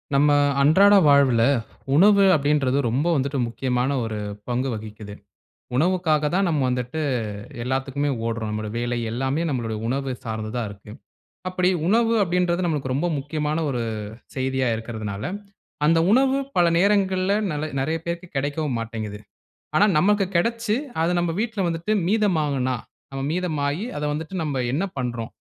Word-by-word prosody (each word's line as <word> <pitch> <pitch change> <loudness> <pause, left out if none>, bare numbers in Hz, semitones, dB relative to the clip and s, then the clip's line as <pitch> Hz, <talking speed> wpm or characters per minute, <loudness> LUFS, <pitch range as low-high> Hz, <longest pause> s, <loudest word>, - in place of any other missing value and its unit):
நம்ம 145 +2 +4 0.3
அன்றாட 190 +8 +6
வாழ்வில 140 -5 +5 0.5
உணவு 200 +4 +6
அப்டின்றது 145 -2 +1
ரொம்ப 130 +7 0
வந்துட்டு 140 0 -1
முக்கியமான 125 +2 -1
ஒரு 110 -1 -4 0.3
பங்கு 125 +2 -1
வகிக்கிது. 105 -1 -8 0.6
உணவுக்காக 155 -1 +2
தான் 195 +1 +2
நம்ம 155 -4 +1
வந்துட்டு 125 +4 -2 0.6
எல்லாத்துக்குமே 135 +3 -1 0.2
ஓடுறோம் 115 -2 -2
நம்முடைய 105 0 -4
வேலை 120 0 -1
எல்லாமே 135 +6 -1
நம்மளுடைய 115 -6 -2
உணவு 135 +2 -1
சார்ந்ததா 110 +1 -3
இருக்கு. 100 +1 -12 0.6
அப்டி 185 0 +1 0.2
உணவு 230 +3 +3
அப்டின்றது 180 0 0
நமக்கு 145 -5 -2
ரொம்ப 150 +7 0
முக்கியமான 150 +2 -2
ஒரு 125 -3 -2 0.5
செய்தியா 130 -1 0
இருக்கறதுனால, 110 -3 -5 0.6
அந்த 165 +1 +4
உணவு 265 +2 +4 0.2
பல 175 - +5
நேரங்கள்ல 190 0 +2 0.2
நல 155 +1 -3
நெறைய 160 +4 0
பேருக்கு 170 +1 -4
கிடைக்கவும் 145 -2 -1
மாட்டேங்குது. 110 -2 -5 0.6
ஆனா, 205 - +6
நமக்கு 200 +2 +3
கிடைச்சு 230 +3 0 0.3
அத 165 - +2
நம்ப 175 -1 0
வீட்ல 220 -3 -2
வந்துட்டு 165 +4 -3 0.2
மீதமாகுனா 150 - +1 0.4
நம்ம 135 - -4
மீதமாயி, 160 -2 -1
அத 150 - -4
வந்துட்டு 160 +5 -5
நம்ம 140 -4 -1
என்ன 160 +7 0
பண்றோம்? 120 -3 -3
145 Hz, 135 wpm, -23 LUFS, 125-175 Hz, 0.6 s, அன்றாட